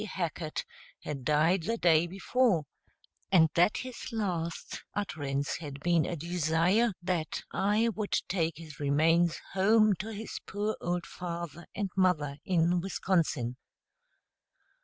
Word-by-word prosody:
Hackett, 170 Hz, -5 st, -3 dB, 0.4 s
had 140 Hz, -3 st, -5 dB
died 155 Hz, +6 st, +3 dB
the 230 Hz, +7 st, -1 dB
day 170 Hz, -3 st, +4 dB
before, 195 Hz, 0 st, +1 dB, 0.7 s
and 160 Hz, -5 st, +6 dB
that 175 Hz, +5 st, +4 dB
his 255 Hz, 0 st, -6 dB
last 175 Hz, -7 st, -3 dB
utterance 145 Hz, -8 st, -2 dB
had 145 Hz, -4 st, -7 dB
been 170 Hz, -1 st, +2 dB
a 175 Hz, -, -2 dB
desire 170 Hz, +7 st, +2 dB
that 175 Hz, -3 st, -2 dB
I 210 Hz, +4 st, +2 dB
would 210 Hz, -1 st, -2 dB
take 165 Hz, -4 st, 0 dB
his 155 Hz, -4 st, -11 dB
remains 160 Hz, +4 st, +3 dB
home 215 Hz, +2 st, +5 dB
to 220 Hz, +3 st, -4 dB
his 215 Hz, 0 st, -6 dB
poor 210 Hz, +2 st, -1 dB
old 175 Hz, 0 st, -1 dB
father 170 Hz, -1 st, -6 dB
and 200 Hz, -2 st, -2 dB
mother 160 Hz, -7 st, +2 dB
in 175 Hz, -1 st, +2 dB
Wisconsin. 165 Hz, -10 st, 0 dB
175 Hz, 125 wpm, -30 LUFS, 160-195 Hz, 0.7 s, and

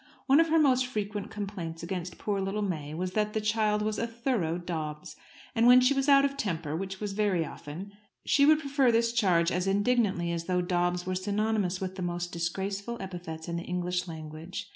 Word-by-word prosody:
One 275 Hz, +2 st, +5 dB
of 330 Hz, -, +4 dB
her 325 Hz, -, +4 dB
most 260 Hz, -4 st, +4 dB
frequent 210 Hz, -3 st, -4 dB
complaints 185 Hz, -6 st, -5 dB
against 180 Hz, 0 st, -4 dB
poor 200 Hz, -2 st, -1 dB
little 195 Hz, +2 st, -2 dB
May 155 Hz, -6 st, -3 dB
was 180 Hz, +2 st, -2 dB
that 210 Hz, +1 st, 0 dB
the 220 Hz, -, 0 dB
child 215 Hz, -1 st, +1 dB
was 215 Hz, 0 st, -1 dB
"a 230 Hz, -, -1 dB
thorough 230 Hz, -8 st, -1 dB
Dobbs." 155 Hz, -2 st, -5 dB, 0.4 s
And 230 Hz, -1 st, +4 dB
when 250 Hz, +1 st, +9 dB
she 255 Hz, +2 st, +4 dB
was 270 Hz, +1 st, 0 dB
out 275 Hz, 0 st, +7 dB
of 275 Hz, 0 st, -1 dB
temper 165 Hz, -, -2 dB
which 190 Hz, +2 st, -4 dB
was 205 Hz, -2 st, -3 dB
very 195 Hz, -5 st, +1 dB
often 165 Hz, +7 st, -8 dB, 0.3 s
she 280 Hz, -, +4 dB
would 310 Hz, 0 st, +7 dB
prefer 275 Hz, -4 st, +2 dB
this 230 Hz, 0 st, +2 dB
charge 180 Hz, -7 st, +3 dB
as 180 Hz, +2 st, -1 dB
indignantly 200 Hz, -4 st, +1 dB
as 170 Hz, -1 st, -3 dB
though 180 Hz, 0 st, +1 dB
Dobbs 175 Hz, 0 st, 0 dB
were 185 Hz, -, -2 dB
synonymous 200 Hz, 0 st, 0 dB
with 190 Hz, 0 st, -5 dB
the -, -, -4 dB
most 175 Hz, 0 st, -3 dB
disgraceful 195 Hz, +7 st, -3 dB
epithets 175 Hz, -4 st, -7 dB
in 170 Hz, 0 st, -2 dB
the 170 Hz, -, -4 dB
English 180 Hz, 0 st, -2 dB
language. 160 Hz, +2 st, -7 dB
190 Hz, 205 wpm, -29 LUFS, 175-220 Hz, 0.4 s, when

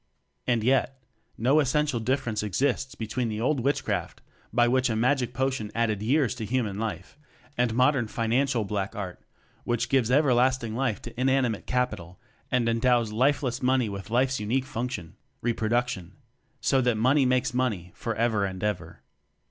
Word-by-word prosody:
And 120 Hz, -3 st, +2 dB
yet, 130 Hz, +1 st, +1 dB, 0.3 s
no 130 Hz, +7 st, +3 dB
essential 145 Hz, -2 st, +1 dB
difference 120 Hz, -2 st, -1 dB
exists 130 Hz, +6 st, -1 dB
between 115 Hz, +1 st, -2 dB
the 105 Hz, 0 st, -3 dB
old 130 Hz, +4 st, +1 dB
witchcraft, 140 Hz, +4 st, -2 dB, 0.3 s
by 120 Hz, +1 st, +3 dB
which 130 Hz, +1 st, +2 dB
a 110 Hz, -, 0 dB
"magic 125 Hz, +2 st, +1 dB
po 130 Hz, +2 st, 0 dB
tion" 110 Hz, -5 st, -4 dB
added 110 Hz, -3 st, 0 dB
years 130 Hz, +4 st, +2 dB
to 120 Hz, -3 st, -5 dB
human 110 Hz, -3 st, -1 dB
life, 115 Hz, +6 st, -5 dB, 0.4 s
and 120 Hz, -2 st, +1 dB
modern 130 Hz, -1 st, +3 dB
"financial" 115 Hz, +3 st, 0 dB
black 100 Hz, +1 st, -3 dB
art 95 Hz, -4 st, -6 dB, 0.4 s
which 120 Hz, -1 st, -1 dB
gives 130 Hz, -4 st, +2 dB
everlasting 130 Hz, -4 st, +2 dB
life 125 Hz, -4 st, -1 dB
to 120 Hz, 0 st, -9 dB
inanimate 130 Hz, -4 st, +1 dB
"capital" 110 Hz, -9 st, -2 dB, 0.3 s
and 125 Hz, -2 st, +1 dB
endows 115 Hz, -1 st, +2 dB
lifeless 130 Hz, +2 st, +1 dB
"money" 130 Hz, -3 st, +2 dB
with 100 Hz, 0 st, -7 dB
life's 130 Hz, +3 st, +1 dB
unique 120 Hz, +5 st, 0 dB
function 125 Hz, -, -5 dB, 0.3 s
reproduc 120 Hz, +1 st, +1 dB
tion 90 Hz, -8 st, -7 dB, 0.5 s
so 135 Hz, -, +3 dB
that 120 Hz, -3 st, +1 dB
"money 130 Hz, +4 st, +3 dB
makes 125 Hz, -1 st, +1 dB
money" 110 Hz, -9 st, -1 dB
for 115 Hz, -1 st, -4 dB
ever 110 Hz, -2 st, +1 dB
and 95 Hz, -1 st, -4 dB
ever. 90 Hz, -6 st, -3 dB
120 Hz, 160 wpm, -27 LUFS, 110-130 Hz, 0.5 s, no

